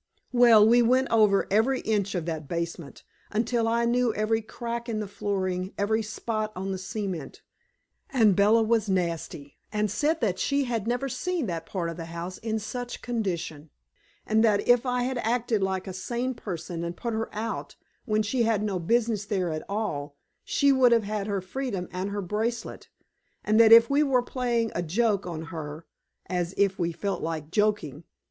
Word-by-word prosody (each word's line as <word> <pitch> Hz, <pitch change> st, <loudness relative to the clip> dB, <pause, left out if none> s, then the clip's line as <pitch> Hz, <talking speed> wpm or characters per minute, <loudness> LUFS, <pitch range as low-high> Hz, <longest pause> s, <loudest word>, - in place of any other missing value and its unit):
Well, 235 Hz, -4 st, +7 dB
we 240 Hz, +2 st, +6 dB
went 255 Hz, +3 st, +3 dB
over 210 Hz, -3 st, +4 dB
every 230 Hz, +6 st, +2 dB
inch 205 Hz, -3 st, 0 dB
of 170 Hz, -3 st, -2 dB
that 160 Hz, -3 st, -4 dB
basement, 170 Hz, -3 st, -5 dB, 0.3 s
until 230 Hz, +1 st, 0 dB
I 235 Hz, +1 st, +2 dB
knew 240 Hz, 0 st, +2 dB
every 220 Hz, +1 st, +1 dB
crack 235 Hz, +2 st, -5 dB
in 220 Hz, -2 st, -1 dB
the 210 Hz, -, -3 dB
flooring, 190 Hz, -2 st, -2 dB
every 220 Hz, +2 st, +1 dB
spot 215 Hz, 0 st, -3 dB
on 190 Hz, +1 st, -3 dB
the 190 Hz, -, -3 dB
cement. 190 Hz, -4 st, -5 dB, 0.7 s
And 220 Hz, -7 st, +4 dB
Bella 215 Hz, +4 st, +5 dB
was 220 Hz, -1 st, +1 dB
nasty, 170 Hz, -6 st, -3 dB
and 210 Hz, -1 st, 0 dB
said 305 Hz, +8 st, +1 dB
that 200 Hz, -6 st, 0 dB
she 280 Hz, 0 st, +1 dB
had 230 Hz, -4 st, -2 dB
never 245 Hz, +3 st, 0 dB
seen 350 Hz, +3 st, -2 dB
that 165 Hz, -4 st, -4 dB
part 180 Hz, -4 st, -3 dB
of 165 Hz, 0 st, -5 dB
the 165 Hz, -, -5 dB
house 170 Hz, +2 st, -6 dB
in 220 Hz, -1 st, -2 dB
such 245 Hz, +3 st, -6 dB
condition, 175 Hz, -10 st, -3 dB, 0.6 s
and 220 Hz, +1 st, +3 dB
that 210 Hz, -3 st, +2 dB
if 245 Hz, +1 st, +4 dB
I 250 Hz, 0 st, +1 dB
had 255 Hz, 0 st, -2 dB
acted 230 Hz, -2 st, 0 dB
like 190 Hz, -1 st, -1 dB
a 190 Hz, -, -6 dB
sane 240 Hz, +7 st, -2 dB
person 175 Hz, -6 st, -5 dB
and 170 Hz, 0 st, -5 dB
put 235 Hz, -1 st, -3 dB
her 220 Hz, +1 st, -2 dB
out, 220 Hz, +2 st, -4 dB, 0.3 s
when 215 Hz, -2 st, +1 dB
she 240 Hz, +4 st, 0 dB
had 225 Hz, -3 st, +2 dB
no 200 Hz, -3 st, -1 dB
business 220 Hz, +2 st, +1 dB
there 190 Hz, -4 st, -1 dB
at 155 Hz, 0 st, -3 dB
all, 150 Hz, -9 st, -3 dB, 0.3 s
she 280 Hz, 0 st, +3 dB
would 260 Hz, -2 st, +5 dB
have 230 Hz, -2 st, +4 dB
had 205 Hz, 0 st, -3 dB
her 200 Hz, -2 st, -1 dB
freedom 195 Hz, -2 st, -4 dB
and 185 Hz, +2 st, -3 dB
her 200 Hz, 0 st, -3 dB
bracelet, 220 Hz, +5 st, -3 dB, 0.5 s
and 215 Hz, +1 st, +3 dB
that 225 Hz, -1 st, +7 dB
if 230 Hz, 0 st, +9 dB
we 280 Hz, +1 st, +2 dB
were 265 Hz, -4 st, +3 dB
playing 240 Hz, -3 st, -1 dB
a -, -, -1 dB
joke 200 Hz, +3 st, 0 dB
on 165 Hz, -2 st, -5 dB
her 155 Hz, 0 st, -6 dB, 0.4 s
(as 180 Hz, 0 st, -2 dB
if 195 Hz, -1 st, +2 dB
we 170 Hz, -1 st, 0 dB
felt 200 Hz, +4 st, -3 dB
like 160 Hz, -2 st, -4 dB
joking!) 205 Hz, -8 st, 0 dB
215 Hz, 185 wpm, -27 LUFS, 185-235 Hz, 0.7 s, if